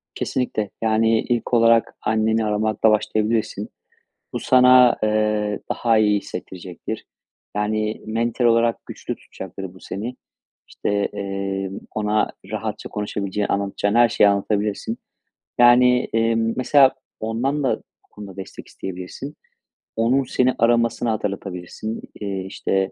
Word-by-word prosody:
Kesinlikle. 110 -5 -2
Yani, 110 0 +3
ilk 120 0 -2
olarak 115 -1 +4
anneni 110 0 +1
aramakla 110 +1 +2
başlayabilirsin. 110 -1 0 0.6
Bu - - -2
sana, 125 -1 +6
eee, 105 -1 +1
daha 115 -2 +2
iyi 105 -1 +3
hissettirecektir. 90 -2 -7 0.5
Yani, 110 +1 -1
mental 115 +2 -1
olarak 115 0 +2
güçlü - - -6
tutacaktır 95 -2 -9
bu 95 - -15
seni. 110 +8 -5 0.5
İşte, 100 0 -1
eee, 100 -1 -3 0.2
ona 105 0 +1 0.2
rahatça - - -4
konuşabileceğin, 105 -1 -2
anlatacağın 100 +1 -1
her 120 -1 +6
şeyi 105 - +4
anlatabilirsin. 105 +2 -1 0.6
Yani, 125 +1 +6
eee, 115 0 +2
mesela 130 +4 +4 0.3
ondan 125 +7 -1
da 130 - +2
bu - - -30
konuda 100 -3 -10
destek 95 - -9
isteyebilirsin. 95 +11 -7 0.6
Onun 120 +5 +2
seni 130 0 +1
aramasını 115 0 +2
hatırlatabilirsin. 100 0 -4 0.2
Eee, 100 -2 -3
işte, 95 0 -1
110 Hz, 115 wpm, -22 LUFS, 100-115 Hz, 0.6 s, sana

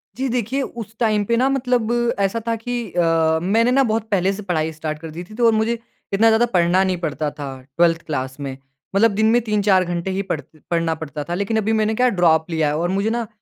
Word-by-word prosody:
जी 265 +2 -2
देखिए, 250 +3 -1
उस 225 -4 -7
टाइम 215 -3 +2
पे 235 - +1
ना 260 +2 +3
मतलब 250 -4 0 0.3
ऐसा 200 +3 +1
था 230 - +1
कि 245 +2 -5 0.2
अ, 165 -2 +2
मैंने 225 +6 +2
ना 270 +1 +4
बहुत 220 0 -1
पहले 195 -1 +2
से 210 - -7
पढ़ाई 160 -4 -1
स्टार्ट 155 -1 -5
कर 165 0 -8
दी 170 +3 -7
थी - - -11
तो 240 0 +2
और 230 - +6
मुझे 220 +2 +1 0.4
इतना 220 +3 +4
ज़्यादा 225 +2 +4
पढ़ना 180 -3 +2
नहीं 185 -1 0
पड़ता 150 0 -2
था 140 - -4 0.3
12th 170 -1 +3
क्लास 130 -2 -4
में। 135 -2 -5 0.4
मतलब 225 +2 +5
दिन 220 +2 +1
में 240 +1 +4
3-4 205 -4 +2
घंटे 175 +2 -3
ही 195 +1 -1
पढ़ 150 - -1 0.3
पढ़ना 165 -1 +1
पड़ता 155 -2 -6
था। - - -1
लेकिन 200 +3 -1
अभी 220 +1 +1
मैंने 220 0 +1
क्या 250 +1 +3
ड्रॉप 160 -1 +3
लिया 160 -2 +1
है 145 - 0
और 175 +2 -1
मुझे 200 +3 0
ना 235 -1 -2
195 Hz, 235 wpm, -21 LUFS, 165-225 Hz, 0.4 s, और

